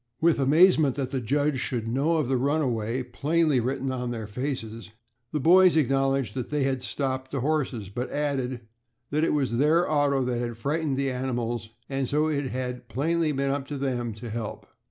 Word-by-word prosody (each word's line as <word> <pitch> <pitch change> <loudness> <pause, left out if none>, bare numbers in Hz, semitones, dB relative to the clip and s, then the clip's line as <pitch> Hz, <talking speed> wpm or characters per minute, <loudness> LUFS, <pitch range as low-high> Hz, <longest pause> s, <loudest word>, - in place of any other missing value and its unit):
With 165 -2 +3
amazement 150 0 +5
that 130 -2 -3
the 130 - -1
judge 145 +4 +1
should 120 -3 -2
know 140 +8 +1
of 155 -5 0
the 135 - +1
runaway, 130 -4 0
plainly 150 +1 +1
written 130 +2 -1
on 125 -1 -3
their 115 -2 -4
faces, 115 -1 -5 0.4
the 150 - -1
boys 180 +3 +6
acknowledged 135 -4 +1
that 125 0 -4
they 150 -2 0
had 135 -1 0
stopped 130 0 -2
the 135 -2 -3
horses, 130 -8 -1
but 125 +5 -4
added 135 -4 -2 0.5
that 150 +2 +1
it - - +2
was 130 -5 0
their 160 +5 +4
auto 145 -3 +2
that 125 -1 -1
had 120 -1 -3
frightened 145 +2 -1
the 135 -1 0
animals, 120 -3 -3 0.2
and 135 -2 -2
so 150 +2 +2
it 145 -3 -1
had 125 -1 -5
plainly 155 +7 +1
been 140 -1 0
up 140 0 -3
to 145 - -4
them 125 -4 -2
to 115 +1 -8
help. 110 -1 -5
135 Hz, 190 wpm, -26 LUFS, 125-145 Hz, 0.5 s, boys